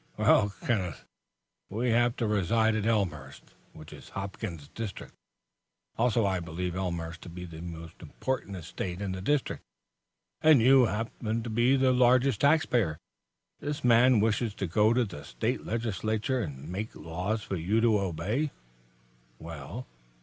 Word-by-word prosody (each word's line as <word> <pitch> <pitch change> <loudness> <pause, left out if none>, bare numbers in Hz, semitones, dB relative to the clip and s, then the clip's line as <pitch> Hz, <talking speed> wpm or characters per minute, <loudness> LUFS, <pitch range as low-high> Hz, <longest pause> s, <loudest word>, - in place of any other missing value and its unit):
"Well, 105 - +4
Kenneth, 95 -9 -1 0.6
we 115 +5 0
have 120 +1 +3
to 120 - -1
reside 110 +2 +2
at 110 0 -1
Elmhurst, 80 -12 -2 0.2
which 75 -1 -12
is - - -12
Hopkins's 95 -6 -6
district. 110 -5 -7 0.8
Also 115 -2 +2
I 95 -2 +1
believe 85 +1 -4
Elmhurst 85 -3 -3
to - - -9
be 90 +1 -7
the 80 -2 -9
most 85 -2 -9
important 130 -7 -4
estate 90 +1 -5
in 100 -2 -3
the 95 0 -4
district, 145 +7 0 0.8
and 155 -3 +7
you 130 +1 +6
to 110 +2 -3
be 120 +4 +4
the 130 -1 +3
largest 125 -1 +4
taxpayer. 125 - +3 0.6
This 145 0 -4
man 125 0 +6
wishes 110 0 +1
to 95 - -2
go 105 +6 +3
to 120 0 +3
the 90 -8 -9
State - - -3
Legislature 110 +2 -1
and 70 - -6
make 100 +6 -5
laws 95 +7 -3
for 95 - -3
you 95 +6 +1
to 110 -3 +4
obey." 100 - -1 0.9
"Well?" 80 - -7
105 Hz, 145 wpm, -29 LUFS, 90-120 Hz, 0.9 s, and